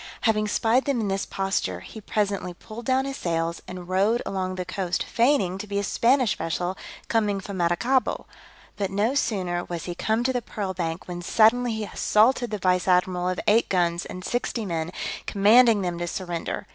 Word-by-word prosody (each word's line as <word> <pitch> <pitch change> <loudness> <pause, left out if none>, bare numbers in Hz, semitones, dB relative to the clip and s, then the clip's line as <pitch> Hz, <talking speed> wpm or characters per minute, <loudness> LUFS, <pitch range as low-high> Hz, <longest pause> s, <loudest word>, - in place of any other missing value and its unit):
Having 215 -2 +2
spied 230 +4 +2
them 275 -4 0
in 210 -3 -1
this 195 0 -1
posture, 195 - -2
he 220 - -10
presently 200 -4 -2
pulled 225 +5 -10
down 265 +1 +2
his 275 0 -4
sails, 165 -1 -2
and 180 -1 -8
rowed 200 +6 +2
along 185 -1 -2
the 180 -1 -4
coast 185 -1 -2
feigning 230 -7 +1
to 210 - -6
be 200 0 -3
a 200 - 0
Spanish 235 - +2
vessel 175 +3 -2 0.3
coming 210 -3 +1
from 195 0 -7
Maracaibo; 210 +10 +1 0.5
but 200 -2 -1
no 205 +6 +1
sooner 185 -10 -1
was 170 -2 -5
he 175 - -4
come 220 +6 0
to 260 +1 +1
the 245 - -1
pearl 200 -4 -4
bank, 165 -1 -4
when 175 -1 -5
suddenly 230 +6 +3
he 220 0 -3
assaulted 235 +4 +2
the 210 - -2
vice 180 -1 +1
admiral 180 0 +2
of 185 - -2
eight 220 +3 +4
guns 175 -2 +1
and 185 0 -8
sixty 240 -2 -2
men, 165 -3 -2 0.4
commanding 215 +1 +5
them 175 -1 -2
to 175 - -2
surrender. 175 -2 -4
195 Hz, 190 wpm, -25 LUFS, 180-225 Hz, 0.5 s, commanding